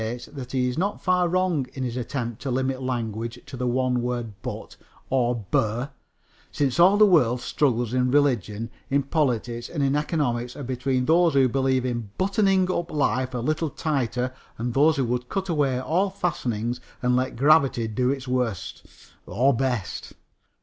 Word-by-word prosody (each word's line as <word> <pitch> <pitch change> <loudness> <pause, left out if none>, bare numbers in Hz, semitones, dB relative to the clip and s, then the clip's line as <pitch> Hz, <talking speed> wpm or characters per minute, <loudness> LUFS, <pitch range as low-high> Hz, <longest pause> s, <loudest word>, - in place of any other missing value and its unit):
that 130 -4 -7
he 130 -1 +1
is 125 +5 -2
not 200 +3 -1
far 180 -1 +2
wrong 180 -7 +1
in 135 - -3
his 120 -2 -3
attempt 120 -2 -4
to 140 - -3
limit 130 +1 -1
language 115 -2 -3
to - - -9
the 125 0 -2
one 125 0 +1
word 120 -2 -3
"but" - - -6 0.4
or 120 -4 +1
"bur," 115 +5 0 0.6
since 140 +1 0
all 190 +4 +7
the 215 - +7
world 125 - +4
struggles 120 -4 0
in 125 0 +2
religion, 120 -6 +1 0.2
in 140 +1 +2
politics 125 -5 -1
and 150 -4 -2
in 135 +1 +2
economics 125 -6 -1
are 145 - -6
between 130 0 -1
those 165 0 +4
who 135 -1 +5
believe 130 0 +1
in 120 -4 -3
buttoning 195 -1 +2
up 175 -1 -2
life 130 -3 0
a - - 0
little 155 +6 -1
tighter 130 -4 -1 0.2
and 120 +1 -3
those 150 +4 +4
who 135 - +1
would 125 +1 -2
cut 195 -1 -2
away 140 -6 +1
all 175 +9 +1
fastenings 125 - -2 0.2
and 125 0 +3
let 130 +1 0
gravity 135 -4 +4
do 125 +4 0
its 135 -1 -2
worst 125 -8 -2 0.4
or 125 +10 +2
best. 125 -5 -2
130 Hz, 170 wpm, -25 LUFS, 120-150 Hz, 0.6 s, all